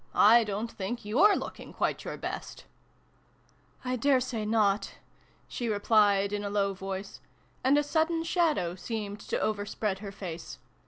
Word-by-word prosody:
I 230 +3 +7
don't 210 +2 -3
think 205 +4 -5
you 220 - +2
re 405 - +4
looking - - -6
quite - - -1
your - - -5
best! - - -6 0.4
" - - -36 0.2
" - - -30
I 255 0 -1
daresay 255 -3 +1
not," 210 -2 +1 0.5
she 240 -2 -3
replied 205 -1 +3
in 205 0 -2
a 200 - -2
low 200 -1 +1
voice; 195 +1 -6 0.4
and 270 +3 +4
a 295 - +3
sudden 325 +2 +1
shadow 320 - +1
seemed 205 +2 -5
to - - -3
overspread 205 -1 -2
her 200 -1 -7
face. 180 -4 -7
210 Hz, 160 wpm, -29 LUFS, 200-245 Hz, 0.5 s, I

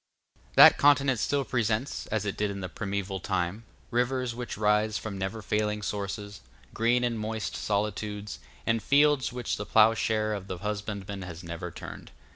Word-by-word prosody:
That - - +9
continent 140 -3 +4
still 140 +3 0
presents, 115 +2 -1
as 105 -1 -1
it 100 - -2
did 105 0 0
in 100 -1 -5
the 90 - -4
primeval 100 0 -3
time, 95 +4 -2 0.3
rivers 125 0 0
which 120 +1 -5
rise 105 0 +2
from 110 -2 -5
never 95 +3 -4
failing 105 0 -1
sources, 100 0 -4 0.3
green 120 +2 +2
and 120 -2 0
moist 110 0 -3
solitudes, 105 0 -2 0.3
and 115 0 +1
fields 145 0 +3
which 125 -2 -3
the 105 - -4
ploughshare 110 -1 +3
of 100 -2 -5
the 95 - -4
husbandman 100 0 -4
has 90 -2 -8
never 85 +1 -5
turned. - - -9
105 Hz, 160 wpm, -28 LUFS, 100-115 Hz, 0.3 s, That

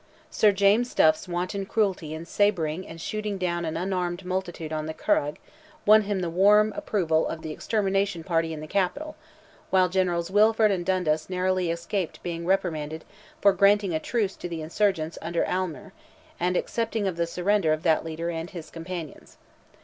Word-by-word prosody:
Sir 210 - +4
James 200 +5 +2
Duff's 155 +2 +4
wanton 180 +3 -3
cruelty 190 -8 0
in 160 +1 -7
sabring 180 -3 0
and 165 - -10
shooting 210 +3 -3
down 175 -2 -1
an 160 0 -3
unarmed 180 0 -2
multitude 180 -4 -3
on 155 0 -3
the 160 - -5
Curragh, 145 +1 +1 0.5
won 215 +1 +7
him 200 -2 -2
the 175 - -1
warm 210 +4 +5
approval 165 -6 0
of 160 - -6
the 155 - -5
extermination 195 -1 -1
party 165 -2 0
in 155 -1 -6
the 155 - -7
Capital, 280 - -1 0.5
while 185 -1 +4
Generals 180 -1 0
Wilford 215 +1 +4
and 185 -3 -1
Dundas 175 -4 0
narrowly 185 -1 0
escaped 170 +2 -3
being 170 -1 -4
reprimanded 160 -5 -1 0.4
for 200 -1 +6
granting 200 -1 +3
a 160 - +1
truce 205 +2 -1
to 175 - -6
the 165 -2 -5
insurgents 170 -1 0
under 170 +1 -1
Aylmer, 185 +1 -3 0.5
and 180 +1 +1
accepting 225 -2 -1
of 185 - -2
the 170 0 -1
surrender 180 0 +1
of 155 0 -1
that 160 -2 +3
leader 165 +1 -4
and 165 +1 -5
his 170 -4 -9
companions. 165 -2 -8
180 Hz, 170 wpm, -26 LUFS, 165-200 Hz, 0.5 s, won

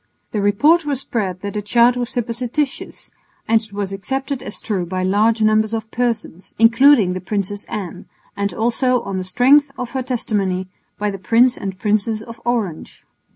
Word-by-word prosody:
The 210 - -1
report 290 +12 +4
was 285 -3 -1
spread 190 -8 -3
that 200 0 -5
the 210 - -2
child 235 +4 +3
was 245 -1 -2
supposititious 245 +4 -3 0.4
and 225 0 +3
it 220 -2 -8
was 200 -1 -3
accepted 270 +6 -3
as - - -4
true 195 -5 -2
by 185 +1 -3
large 215 +4 +2
numbers 215 +1 +2
of 220 0 -6
persons, 230 -7 -3
including 230 -3 +5
the 185 - -5
Princess 205 +1 -3
Anne, 200 -7 -6 0.3
and 200 0 -1
also, 240 +4 +1
on 195 -1 -4
the - - -3
strength 265 +10 +4
of 250 -2 -5
her 265 - -2
testimony, 205 -7 -1 0.3
by 210 0 -1
the 195 - -7
Prince 235 +7 +3
and 190 -1 -6
Princess 215 +1 0
of 230 0 -11
Orange. 220 -9 -3
220 Hz, 175 wpm, -19 LUFS, 200-245 Hz, 0.4 s, including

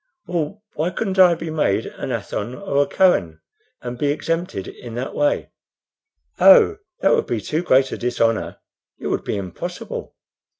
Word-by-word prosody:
"Well, 175 +4 -3
why 160 +4 -1
couldn't 190 +1 -2
I 180 -2 +7
be 165 0 -6
made 155 -1 +1
an - - -6
Athon 125 - -4
or 145 -6 0
a 145 - +1
Kohen, 90 - +2 0.4
and 120 -1 -6
be 145 - +1
exempted 165 - -2
in 120 -2 -9
that 125 +2 -4
way?" 145 0 0 0.9
"Oh, 195 - +7 0.2
that 195 - +4
would - - +1
be 120 - -1
too 155 - -2
great 135 -6 +3
a - - -5
dishonor; 115 -2 0 0.4
it - - -5
would - - -1
be - - -2
impossible. 95 -3 -6
150 Hz, 165 wpm, -21 LUFS, 120-180 Hz, 0.9 s, I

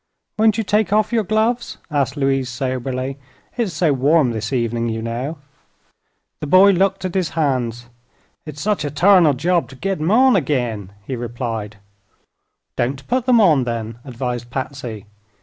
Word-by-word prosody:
"Won't 220 0 +3
you 225 - 0
take 210 0 +1
off 215 +2 +2
your 225 -2 +2
gloves?" 220 +4 0
asked 145 0 0
Louise, 135 -2 0
soberly. 130 +1 -3 0.4
"It's 235 -6 -1
so 155 -1 +2
warm 140 0 +3
this 110 -1 -4
evening, 115 -2 -1
you 110 0 -3
know." 120 +7 -4 1.0
The 150 - -5
boy 185 +6 +7
looked 190 0 +1
at 185 - -3
his 185 -3 0
hands. 125 -6 -1 0.6
"It's 150 -1 -8
sech 210 -4 0
a 145 - -2
tarnal 165 0 +5
job 165 -1 0
to 135 - -12
git 195 +4 -3
'em 160 - 0
on 255 +3 +5
agin," 120 - -1
he 130 - -4
replied. 115 -3 -5 1.0
"Don't 135 +3 -2
put 250 0 0
them 245 -2 +5
on, 160 -11 +4
then," 115 -1 -4
advised 125 -2 -5
Patsy. 130 -5 -5
140 Hz, 160 wpm, -20 LUFS, 120-190 Hz, 1.0 s, boy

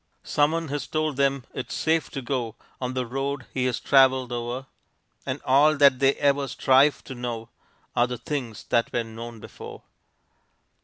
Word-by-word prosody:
Someone 155 +2 +1
has 145 -2 -3
told 155 -2 -1
them 140 -1 +1
it's - - -5
safe 160 0 +1
to 135 - -6
go 120 -3 -2 0.3
On 130 0 -3
the 130 -1 -1
road 135 +1 -3
he 130 -1 0
has 125 -2 0
traveled 130 -2 +4
o'er, 120 +2 -4 0.6
And - - -2
all 145 +3 +5
that 140 -3 +6
they 135 0 +4
ever 140 0 +1
strive 135 +1 +3
to - - -8
know 120 -2 -5 0.5
Are 120 - +3
the 125 0 -4
things 120 -3 -5
that 115 - +2
were 120 - 0
known 115 +1 -9
before. - - -10
130 Hz, 165 wpm, -25 LUFS, 120-140 Hz, 0.6 s, that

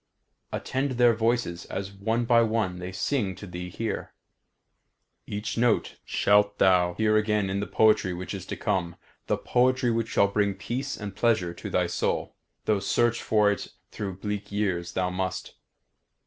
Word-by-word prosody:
Attend 135 +1 -2
their 120 -1 +5
voices 115 -6 0
as 95 +1 -5
one 110 +5 -1
by 115 -1 +5
one 110 -5 0
they 90 +1 -5
sing 95 0 -1
to 100 - -9
thee 90 -1 -6
here. 110 +4 -4 1.1
Each 105 +2 -3
note 120 -2 +1
shalt 105 0 +3
thou 90 -2 +4
hear 110 -1 +3
again 105 -2 +1
in 100 - -1
the 100 - -3
poetry 110 -4 +3
which 90 0 -5
is - - -6
to - - -4
come; 85 -2 -1 0.3
the - - +1
poetry 125 0 +2
which 115 0 0
shall 100 - +3
bring 100 0 0
peace 130 +8 -4
and 100 -2 -6
pleasure 105 -7 +1
to - - -7
thy - - +2
soul, - - -1 0.3
though 105 -2 +2
search 120 +4 +1
for 105 -2 +3
it 100 - -5 0.2
through 100 -3 -4
bleak 105 0 -4
years 90 -4 -1
thou 90 -1 0
must. 95 0 -3
105 Hz, 165 wpm, -27 LUFS, 95-115 Hz, 1.1 s, their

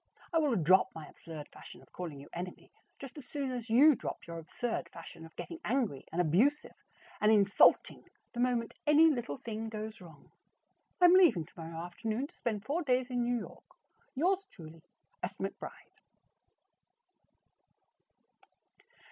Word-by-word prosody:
I 330 - +4
will 295 -6 +2
drop 185 +1 +4
my 160 -1 -7
absurd 155 -1 -10
fashion - - -13
of - - -23
calling 165 -6 -6
you 140 - -12
Enemy 180 +1 -7 0.3
just 275 +2 -9
as 270 - -12
soon 280 -3 -3
as 240 -2 -5
you 280 +7 +7
drop - - -6
your 170 0 -6
absurd 175 +1 -4
fashion 165 -1 -11
of 160 - -23
getting 335 - -7
angry 235 - -1
and 170 - -3
abusive 205 - +2 0.5
and 210 +1 +5
insulting 200 -2 +4 0.3
the 240 - -6
moment 245 -2 0
any 310 +2 +7
little 240 - -3
thing 225 0 -5
goes 215 -1 -6
wrong. 160 -5 -15 0.7
I 360 - +7
am 350 - +8
leaving 320 - +5
tomorrow 165 0 -9
afternoon 220 +8 -3
to - - -15
spend 215 -3 -3
four 310 +5 -1
days 255 -3 +1
in 245 -1 0
New 240 0 +1
York. - - -10 0.4
Yours 380 +7 +1
truly, 160 -2 -12 0.4
S. 185 +2 -4
McBRIDE. 195 - -4
220 Hz, 155 wpm, -32 LUFS, 170-265 Hz, 0.7 s, am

